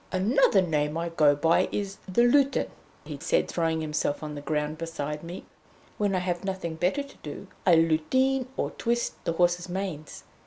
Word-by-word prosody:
"Another 200 +1 +3
name 150 -2 0
I 170 +1 -2
go 150 -3 +4
by 165 +5 +3
is 200 -1 -3
the 190 +6 +3
'Lutin,'" 275 +3 +3 0.3
he - - -7
said, - - +1
throwing 165 -1 0
himself 150 -1 -1
on 150 -1 -5
the 145 - -6
ground 150 +1 -2
beside 150 -2 -4
me. 170 +2 -8 0.5
"When 205 -2 +1
I - - +2
have 175 0 -2
nothing 190 -4 -3
better 180 - 0
to 280 - -15
do, - - -8 0.2
I 175 - +7
lutine, 250 +12 +2
or - - -1
twist, 240 0 -2
the 170 - 0
horses' 175 +1 +1
manes. 175 -5 -5
175 Hz, 180 wpm, -27 LUFS, 155-200 Hz, 0.5 s, I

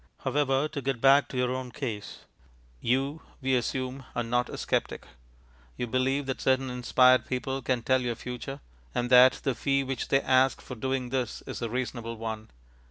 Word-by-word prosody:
However, 135 +1 +1
to 150 -2 -5
get 135 -2 -2
back 140 +3 +5
to 130 - -6
your 125 0 +1
own 130 -1 -3
case. 115 -6 -6 0.5
You, 135 - 0 0.2
we 130 -1 0
assume, 130 +2 -1
are 120 - 0
not 120 +1 0
a - - -6
sceptic. - - -2 0.7
You - - -1
believe 130 +3 0
that 130 -1 -3
certain 130 0 +1
inspired 125 0 +4
people 130 +1 -2
can 125 -2 -1
tell 130 +1 +3
your 120 -2 -2
future, 125 +4 -7 0.3
and 120 +1 -1
that 125 +1 +8
the 135 - +1
fee 135 +3 +1
which 135 -2 -3
they 135 - +3
ask 130 0 +3
for - - -9
doing 130 +1 -2
this 125 -3 -2
is - - -6
a 115 - -2
reasonable 115 -1 -4
one. 110 -1 -5
130 Hz, 180 wpm, -28 LUFS, 125-135 Hz, 0.7 s, that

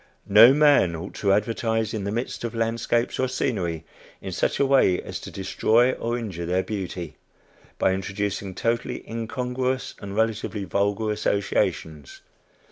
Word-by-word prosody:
No 110 +5 +8
man 145 - +4
ought 85 +4 -7
to 100 - +1
advertise 110 +1 0
in 105 -3 -3
the 100 - -2
midst 120 +3 -4
of 115 -1 -4
landscapes 115 +1 0
or 130 - +2
scenery, 95 -11 -2 0.3
in - - -6
such - - -1
a 140 - +4
way 135 -9 +4
as - - -6
to - - -9
destroy 110 +5 +2
or 120 -1 -2
injure 95 -8 -5
their 90 +2 +1
beauty 90 -6 -5 0.6
by 95 - +2
introducing 95 0 -3
totally 115 +3 -2
incongruous 125 +3 -3
and 100 -1 -7
relatively 110 -2 -1
vulgar 100 +4 0
associations. 90 -8 -1
105 Hz, 145 wpm, -24 LUFS, 95-115 Hz, 0.6 s, No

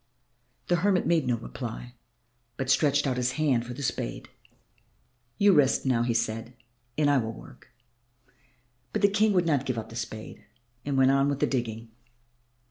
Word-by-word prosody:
The 175 - +2
hermit 185 +1 +2
made 165 -6 +2
no 120 -1 +1
reply, 120 +1 -7 0.6
but 135 -1 0
stretched 145 -1 +3
out 130 -2 -1
his 125 0 0
hand 135 -7 +1
for 125 - -6
the 140 - -6
spade. - - -3 1.1
"You 200 -1 +5
rest 145 -4 +3
now," 125 -3 +2
he 120 -1 0
said, 115 +2 -2 0.4
"and 150 -1 +3
I 145 -2 +4
will 110 -1 -3
work." 130 +3 -14 1.3
But - - -2
the - - +8
King 210 +2 +2
would 180 -2 +2
not 145 -5 +1
give 130 -3 -2
up 110 - -5
the 115 - -11
spade 110 -2 -7 0.4
and 140 0 -2
went 135 0 +5
on 135 +1 +3
with 140 -1 -2
the - - +3
digging. 115 -3 -3
130 Hz, 175 wpm, -27 LUFS, 120-150 Hz, 1.3 s, the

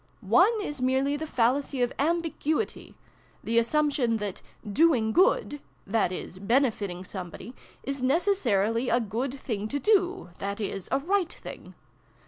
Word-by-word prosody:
" - - -36 0.2
One 440 +3 +4
is 295 -7 -5
merely 265 +2 +1
the 315 +2 -4
fallacy 260 +1 +1
of 245 - -1
ambiguity 325 +3 -1 0.5
the 230 +1 +2
assumption 260 -2 +1
that 205 -3 -5 0.2
' 210 -2 -8
doing 245 -10 +4
good' 290 -2 +2 0.2
(that 205 -2 +1
is, 185 0 -6
bene 240 +6 +3
fiting 190 -4 -6
somebody) 185 +5 -8 0.3
is 275 -1 -3
necessarily 255 - +1
a 235 +1 +3
good 235 +4 -2
thing 225 -6 -4
to 285 - -2
do 380 - +1
(that 200 +1 -3
is, 195 -3 -4
a 270 - +3
right 355 +4 0
thing). - - -10
255 Hz, 150 wpm, -27 LUFS, 220-300 Hz, 0.5 s, One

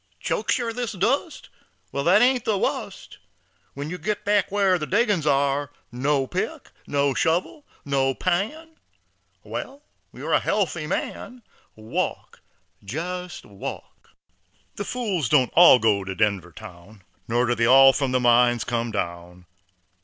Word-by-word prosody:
"Chokes - - -1
yer, 235 -2 -3
this 240 -2 -4
dust? 260 - -1 0.4
Wal, 140 - -2
that 190 +6 +5
Ain't 250 -1 +2
the 215 -2 0
wust, - - -4 0.6
When 145 +3 -5
yer 180 - -6
get 210 +5 -3
back 205 -1 +2
whar 195 -3 +2
the 150 - -4
Diggins 205 -7 +1
are 140 0 +1 0.2
No 135 +2 0
pick, 125 - -5 0.2
no 140 -1 +1
shovel, 175 - -1 0.2
no 135 -1 0
pan; 300 - -2 0.7
Wal, 280 +2 -7 0.3
yer - - -6
a - - +5
healthy - - -1
man, 245 -1 -5 0.3
Walk 110 +1 -4 0.4
jest 180 - -6
walk." 100 -1 -9 0.7
The 205 - -5
fools 195 - -2
don't 130 -5 +3
all 170 -6 +8
go 105 -4 +1
to 95 0 -6
Denver 100 -5 0
town, 100 -1 -13 0.2
Nor 120 +2 +1
do 120 - +1
they 115 -1 +1
all 135 +1 +7
from 135 -2 -1
the 130 - +2
mines 120 -1 +3
come 120 0 -2
down. 90 -3 -5
140 Hz, 145 wpm, -23 LUFS, 120-200 Hz, 0.7 s, all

